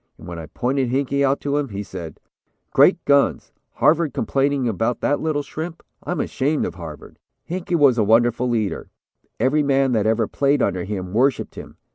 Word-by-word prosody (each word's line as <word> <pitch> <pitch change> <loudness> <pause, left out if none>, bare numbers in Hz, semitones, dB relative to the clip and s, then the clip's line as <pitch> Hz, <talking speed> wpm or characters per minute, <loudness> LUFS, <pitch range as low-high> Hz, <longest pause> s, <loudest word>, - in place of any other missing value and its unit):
And - - -12
when 85 -1 -6
I 80 - -8
pointed 130 - -1
Hinkey 140 +2 0
out 135 0 +2
to 145 0 -1
him, 140 -3 -3
he 100 0 -5
said: 85 -3 -8 0.5
"'Great - - +4
guns, 140 -1 +2 0.2
Harvard 155 -2 +2
complaining 135 +2 0
about 115 +3 -1
that 145 - +1
little 155 -2 -1
shrimp, 160 +4 -7 0.2
I'm 180 - -3
ashamed 145 +3 0
of - - -4
Harvard.' 80 -4 -10 0.3
"Hinkey 180 +1 -2
was 140 -7 +4
a - - +4
wonderful 120 +3 +3
leader. 110 -8 -2 0.5
Every 150 +4 +2
man 135 -2 +2
that 110 -3 +1
ever 110 0 +2
played 140 +1 +1
under 90 -3 -1
him 95 -2 -5
worshipped 130 +4 +1
him. - - -11
130 Hz, 180 wpm, -21 LUFS, 110-145 Hz, 0.5 s, Great